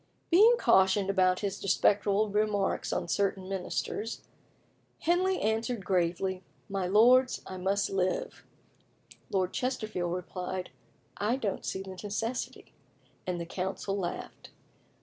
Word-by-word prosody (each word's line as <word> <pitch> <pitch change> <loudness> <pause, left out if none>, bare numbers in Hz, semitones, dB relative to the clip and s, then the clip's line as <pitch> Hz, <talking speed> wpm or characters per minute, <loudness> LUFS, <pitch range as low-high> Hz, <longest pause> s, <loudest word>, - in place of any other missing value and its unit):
Being 430 +8 +7
cautioned 190 - +4
about 185 -1 +2
his 200 -1 -2
disrespectful 205 +1 +2
remarks 210 -1 0
on 175 - -1
certain 195 0 0
ministers, 195 +3 -3 0.8
Henley 370 +2 +2
answered 220 -1 -1
gravely, 185 +1 0 0.3
"My 195 -2 -2
lords, 245 +6 +5
I 185 - -7
must 195 +2 0
live." 195 - -1 0.9
Lord 185 -2 0
Chesterfield 215 -9 -2
replied, 180 +1 -4 0.5
"I 215 +4 +1
don't 215 -7 -3
see 190 - -3
the 190 -1 -8
necessity," 225 +4 -4 0.5
and 180 -1 -1
the 170 - -4
council 190 +3 -3
laughed. 180 -3 -5
195 Hz, 115 wpm, -30 LUFS, 185-220 Hz, 0.9 s, Being